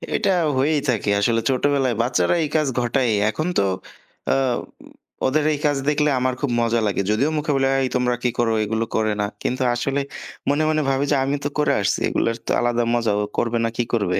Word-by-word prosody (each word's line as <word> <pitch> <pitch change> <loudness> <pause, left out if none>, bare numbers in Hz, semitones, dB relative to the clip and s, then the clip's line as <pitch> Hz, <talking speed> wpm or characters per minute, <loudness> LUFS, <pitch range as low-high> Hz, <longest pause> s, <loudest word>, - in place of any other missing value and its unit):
এটা 195 - +1 0.3
হয়েই 145 +2 +2
থাকে, 105 -3 0
আসলে 115 +2 +2
ছোটবেলায় 135 -2 +1
বাচ্চারা 120 - +1
এই 150 - -2
কাজ 155 -2 +2
ঘটায়। 120 0 +1 0.2
এখন 155 +9 -2
তো - - +3 0.7
আ - - +2 0.9
ওদের 150 +3 +1
এই 145 - -3
কাজ 145 -2 +2
দেখলে 150 0 +2
আমার 130 0 0
খুব 145 - 0
মজা 115 0 +1
লাগে। 100 - 0
যদিও 135 +8 +2
মুখে 150 0 -1
বলি, 135 0 +2 0.2
এই 130 - 0
তোমরা 125 -1 +1
কী 125 - +2
করো? 115 -1 +2
এগুলো 110 +2 -1
করে 110 -1 +1
না। - - +1 0.2
কিন্তু 130 +1 -1
আসলে 135 +3 -1 0.5
মনে, 145 +2 +2
মনে 155 0 +1
ভাবি 135 +1 +1
যে - - +4
আমি 140 +1 0
তো 145 - -1
করে 150 - +3
আসছি, - - 0
এগুলো 115 - 0 0.2
তো - - -1
আলাদা 120 0 +1
মজা, 115 -3 +1
ও - - 0
করবে 120 0 0
না, - - 0
কি 120 - +2
করবে? 100 -6 +1
125 Hz, 205 wpm, -22 LUFS, 115-145 Hz, 0.9 s, যে